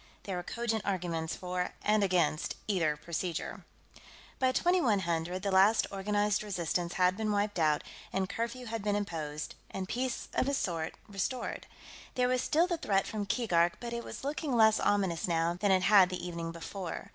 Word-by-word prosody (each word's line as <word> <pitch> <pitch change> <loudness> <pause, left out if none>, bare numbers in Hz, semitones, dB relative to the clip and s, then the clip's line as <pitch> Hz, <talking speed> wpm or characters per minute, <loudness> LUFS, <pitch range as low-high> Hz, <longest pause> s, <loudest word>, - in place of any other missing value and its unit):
There 195 - -3
were 180 - -2
cogent 225 +2 -2
arguments 170 -4 -2
for 180 0 -3
and 210 0 +3
against 175 -5 +1
either 165 -7 +1
procedure. 170 +2 -4 0.7
By 260 -1 +3
2100, 190 - +1
the 200 - 0
last 195 +4 +5
organized 205 +1 +1
resistance 175 -4 -2
had 180 0 +3
been 215 0 -1
wiped 205 -2 0
out, 155 -2 +3 0.3
and 190 0 0
curfew 235 +5 -3
had 225 -2 -4
been 205 -1 +1
imposed, 155 -7 -3 0.2
and 190 -1 -4
peace 250 +2 -2
of 265 - +1
a 280 - +1
sort 165 -9 -2
restored. 205 +5 -3 0.5
There 250 0 +3
was 255 0 +2
still 325 +6 +3
the 350 -2 -1
threat 195 -7 +1
from 210 -2 -3
Keegark, 175 -7 +2
but 235 -1 -5
it 235 0 -3
was - - -8
looking 285 -1 -2
less 220 -1 +6
ominous 190 -5 +1
now 165 0 +1
than 205 - +3
it 185 -1 +4
had 200 -3 +7
the 180 -1 -4
evening 170 -1 -4
before. 170 +1 -6
195 Hz, 175 wpm, -31 LUFS, 175-220 Hz, 0.7 s, had